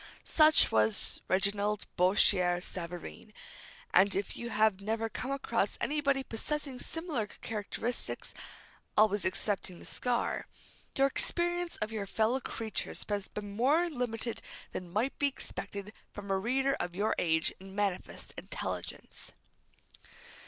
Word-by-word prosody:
Such 310 -1 +7
was 110 -1 +3
Reginald 200 +2 +2
Bourchier 180 -1 +4
Savareen, 175 +3 -6 0.6
and 195 +1 +5
if 195 +1 -2
you 235 - -5
have 215 -3 +3
never 225 +2 -1
come 250 +4 -4
across 275 0 0
anybody 280 -2 +1
possessing 270 +2 -2
similar 320 -10 -2
characteristics 225 +3 -4 0.6
always 210 -2 +4
excepting 185 -1 -1
the - - -12
scar 245 -1 -1 0.5
your 270 - +4
experience 345 +5 0
of 215 - -4
your 210 -3 -3
fellow 225 +6 +2
creatures 225 -3 -3
has 205 -2 -1
been 205 -1 -6
more 290 +10 +4
limited 240 -3 -2 0.3
than 180 -2 -6
might 225 +8 0
be 285 - +4
expected 205 -6 -5 0.2
from 200 -1 -6
a 190 - +2
reader 265 +6 +2
of 175 0 -3
your 210 +3 +2
age 160 -2 +2
and 190 0 -11
manifest 200 -3 -2
intelligence. - - -5
215 Hz, 125 wpm, -32 LUFS, 195-260 Hz, 0.6 s, Such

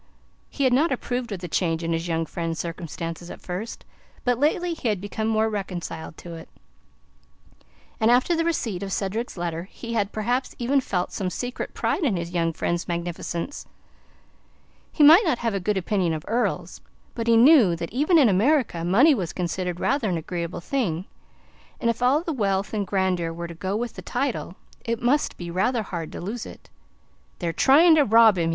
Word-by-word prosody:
He 280 - -3
had 260 -2 +4
not 295 +6 +3
approved 245 -2 -3
of 190 -3 -4
the 175 - -5
change 165 -1 0
in 165 0 -1
his 165 +1 -2
young 165 -1 0
friend's 165 -1 -4
circumstances 170 0 -5
at - - -8
first, 190 +6 -6 0.4
but 245 -1 +1
lately 340 +4 +1
he 315 - -4
had 210 -4 +1
become 205 +3 -3
more 220 0 +2
reconciled 185 -6 -5
to 170 - -9
it, 165 -1 -10 1.5
and 220 - +3
after 255 +8 +4
the 330 - +1
receipt 235 - -1
of 195 -1 -4
Cedric's 205 +4 -3
letter 170 -1 -3
he 230 -1 -7
had 205 -3 0
perhaps 245 +4 -1
even 265 +3 +2
felt 180 -7 -2
some 190 -2 -2
secret 245 +6 -5
pride - - 0
in 245 -10 +2
his 170 0 -4
young 165 -2 0
friend's 170 +2 -2
magnificence. 170 - -4 1.3
He 305 - +2
might 320 +7 +9
not 320 - +1
have 230 -2 -1
a 195 - -1
good 205 +2 0
opinion 185 -2 0
of 155 -1 -5
earls, 205 -6 -1 0.3
but 230 -1 -4
he 230 -1 +5
knew 240 - +6
that 170 +3 -6
even 300 +7 +3
in 285 -6 +6
America 215 - +2
money 235 - +5
was 185 - -2
considered 180 0 -3
rather 275 -6 +1
an 175 - 0
agreeable 170 +1 -4
thing, 185 - -1 0.7
and 235 - +2
if 230 - -8
all 270 +6 +3
the 330 - -2
wealth 200 -5 -1
and 205 -3 -1
grandeur 185 -3 0
were 170 +1 -6
to 170 - -8
go 190 +4 -3
with 235 +1 -3
the - - -8
title, 250 -7 -3 0.3
it 230 -1 -2
must 265 +5 +1
be 170 -1 -6
rather 220 +6 +1
hard 170 -5 -5
to - - -7
lose 215 +6 -5
it. - - -14 0.7
"They're 170 -2 -2
trying 305 - +6
to 295 - +6
rob 220 -4 +6
him!" 165 -1 +1
205 Hz, 195 wpm, -24 LUFS, 175-245 Hz, 1.5 s, might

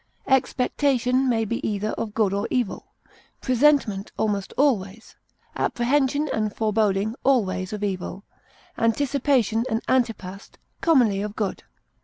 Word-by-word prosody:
Expectation 260 0 +1
may 225 -2 +1
be 235 +3 -3
either 210 0 -1
of 215 -2 -5
good 210 -4 +2
or 200 - -1
evil; 245 -5 -2 0.5
presentiment 255 -6 +2
almost 200 -3 -1
always, 225 -7 0 0.4
apprehension 280 +4 +1
and 215 -1 -1
foreboding 215 -1 +1
always, 185 -8 +1
of 210 -1 -5
evil; 195 0 -4 0.6
anticipation 240 -1 +1
and 225 0 -2
antepast, 210 -7 -2 0.2
commonly 240 -12 +3
of 210 0 -5
good. 205 -3 -2
225 Hz, 115 wpm, -24 LUFS, 200-260 Hz, 0.6 s, commonly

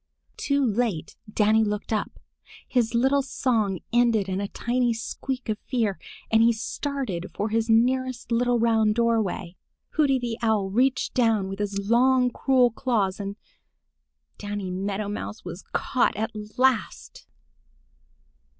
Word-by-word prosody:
Too 280 -1 +1
late 215 -8 -1 0.2
Danny 215 +1 +3
looked 210 +1 -2
up. 215 - -3 0.5
His 240 -2 +1
little 265 +4 +3
song 225 -8 -1
ended 235 -4 +3
in 190 +1 -2
a 200 - -2
tiny 240 +2 0
squeak 255 +3 -5
of 215 -1 -2
fear, 225 -7 -1 0.3
and 225 0 +5
he 230 +1 +6
started 225 - -4
for 210 +2 -1
his 225 +1 0
nearest 250 +2 +1
little 245 +1 +2
round 225 -2 +2
doorway. 225 -6 0 0.3
Hooty 285 -4 +2
the 240 -2 -4
Owl 215 -4 +1
reached 255 +4 +1
down 225 -5 +2
with 195 +1 -6
his 205 -1 -2
long 250 +2 +4
cruel 255 -2 +3
claws 215 -6 -1
and—Danny 205 - -9
Meadow 200 +2 -3
Mouse 205 0 -6
was 175 +1 -7
caught 255 - +1
at 220 +2 -2 0.3
last! 255 -4 0
225 Hz, 130 wpm, -25 LUFS, 205-250 Hz, 0.5 s, he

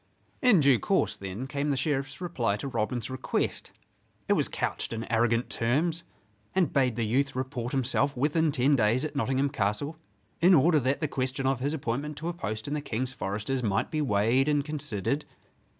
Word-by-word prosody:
In 230 -10 +6
due 135 -4 +5
course, - - +1
then, 95 +6 -6
came 140 +2 -2
the 140 - +1
Sheriff's 135 0 -1
reply 120 - -1
to 140 - -5
Robin's 120 0 -2
request. 130 0 -2 0.6
It - - +4
was - - +2
couched - - -3
in 115 0 -3
arrogant 115 +1 +2
terms, 155 +8 0 0.5
and 185 -3 +2
bade 130 -4 +2
the 115 -1 0
youth 135 +5 0
report 130 -2 -3
himself 135 +1 +1
within 155 +4 +2
ten 140 +2 +3
days 120 +3 +2
at 150 -1 -5
Nottingham 135 +2 +1
Castle 140 +5 -1 0.4
in 180 +2 +7
order 155 +2 +5
that 135 +3 0
the 155 - +1
question 130 0 -2
of 135 -1 +1
his 140 +4 -1
appointment 145 +2 -3
to 165 +2 -3
a - - -3
post 110 -9 -4
in 145 - -2
the 150 - -1
King's 130 -1 -3
Foresters 110 +5 -2
might 100 -4 0
be 155 - 0
weighed 120 +2 +2
and 145 -1 +2
considered. 145 -3 -2
135 Hz, 185 wpm, -28 LUFS, 115-145 Hz, 0.6 s, in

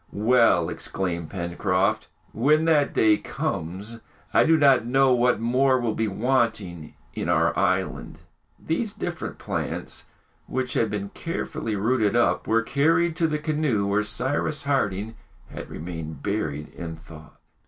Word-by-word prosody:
"Well!" 110 -6 +3
exclaimed 85 -4 -3
Pencroft, 90 +1 -1 0.3
"when 150 +7 +3
that 150 -3 +3
day 110 -1 +4
comes, 100 +9 -4 0.3
I - - +5
do 160 0 +5
not 135 -5 +5
know 135 +2 +3
what 125 0 +2
more 130 +3 +2
will 120 -3 -1
be 110 0 -1
wanting 105 -7 -1 0.2
in - - -3
our 80 +2 +2
island!" 95 -1 -1 0.4
These - - -2
different - - -5
plants, - - -4 0.4
which 130 -1 -2
had 115 - +1
been 100 -1 -4
carefully 155 - -4
rooted, 110 +1 +1
up, 120 - +2
were 115 +1 +2
carried 165 +6 +2
to 165 - +2
the 155 -1 -1
canoe, 150 -9 0
where 100 +1 +1
Cyrus 130 +8 -1
Harding 110 -6 -1 0.3
had - - -8
remained 80 -3 -7
buried 75 -8 -2
in 85 -1 -7
thought. 80 -1 -14
110 Hz, 140 wpm, -25 LUFS, 95-135 Hz, 0.4 s, I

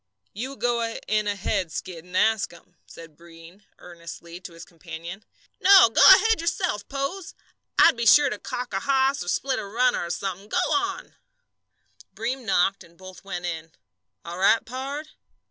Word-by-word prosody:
"You 260 +7 -6
go 240 -2 -1 0.3
in 215 -1 0
ahead, 195 -3 -2
Skid, 170 +1 -7
and 180 +1 -5
ask 220 0 +2
'em," 175 +1 -19
said 165 -2 -13
Breem, 165 +3 -16 0.2
earnestly, 170 0 -11
to 180 -2 -11
his 165 0 -11
companion. 170 +3 -10 0.4
"No, 380 - +7
go - - +3
ahead 435 +1 +7
yourself, 335 - -2
Pose. 280 +7 -5 0.4
I'd - - +6
be 235 0 -1
sure 285 +3 +6
to 210 - -5
calk 250 -3 -6
a 195 - 0
hoss 270 +2 +1
or - - -13
split 260 +8 -1
a - - -6
runner, 245 +3 +1
or 170 - -6
somethin'. 195 +2 -5
Go 360 +7 0
on!" 385 0 -3 1.0
Breem 245 +4 -3
knocked, 195 0 +1
and 170 0 -21
both 185 0 -13
went 180 -3 -6
in. 165 -2 -6 0.5
"All 170 +2 -7
right, 215 +4 +3
pard?" 275 +5 -6
205 Hz, 165 wpm, -24 LUFS, 175-265 Hz, 1.0 s, No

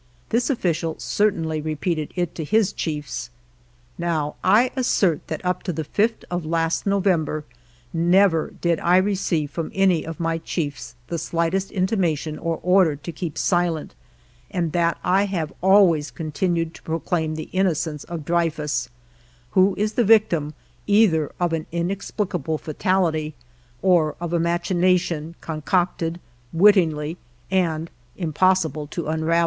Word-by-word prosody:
This 240 +4 +1
official 170 - 0
certainly 165 -7 0
repeated 155 0 -2
it 175 -2 -1
to 160 - -4
his 215 +5 +2
chiefs. 150 -6 -4 0.7
Now, 160 -4 -1
I 220 +7 +4
assert 195 - +1
that 160 +3 -5
up 180 0 0
to 180 - -3
the 160 -1 -3
5th 215 +9 0
of 175 -1 -2
last 165 +3 0
November, 180 -6 +1 0.5
never 175 0 +3
did 170 -2 +1
I 175 +1 +4
receive 185 -6 0
from 165 -2 -4
any 190 -4 +3
of 165 -2 -7
my 165 -1 -1
chiefs 145 -8 -4
the 170 +4 -3
slightest 170 +5 -1
intimation 180 -6 -1
or 165 -1 -2
order 180 -3 +4
to 150 +4 -7
keep 160 -1 -5
silent, 175 -3 0 0.6
and 170 -3 -1
that 170 0 +1
I 190 +3 +3
have 175 -6 -3
always 185 -5 +5
continued 165 +1 -2
to - - -13
proclaim 160 -1 -2
the 155 - -6
innocence 165 -5 0
of 165 -4 -6
Dreyfus, 150 -7 0 0.6
who 190 +3 +4
is 210 +1 0
the 240 - +2
victim 180 -9 +3 0.3
either 200 -8 +3
of 175 -2 +1
an 160 -1 -2
inexplicable 175 -2 -2
fatality, 160 -2 0 0.5
or 175 -5 +3
of 175 0 -4
a 170 - +2
machination 170 -1 +1
concocted 165 +1 -1 0.3
wittingly 165 -4 +3 0.3
and 165 -4 0 0.3
impossible 160 -3 +1
to 165 +2 -5
unravel. 160 +2 +1
170 Hz, 135 wpm, -23 LUFS, 155-185 Hz, 0.7 s, always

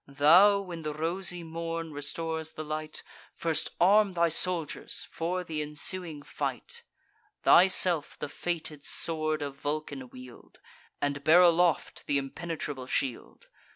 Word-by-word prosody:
Thou, 165 +9 +6
when 175 -4 -7
the 150 -1 -4
rosy 175 +2 -1
morn 165 0 -4
restores 160 +2 -3
the 155 - -5
light, 155 0 -4 0.3
First 165 -2 -1
arm 200 +2 +5
thy 170 -1 +3
soldiers 165 -1 -2
for 180 +2 -2
th' 165 - -14
ensuing 150 +1 -3
fight: 475 - -4 0.6
Thyself 180 -3 +5
the - - -4
fated 155 -1 -4
sword 155 -2 -1
of 140 -1 -6
Vulcan 145 -2 -4
wield, 125 -1 -13 0.4
And 145 0 -1
bear 160 +4 +7
aloft 175 -1 +3
th' 145 - +2
impenetrable 140 -2 -4
shield. 130 -3 -3
160 Hz, 125 wpm, -29 LUFS, 145-175 Hz, 0.6 s, bear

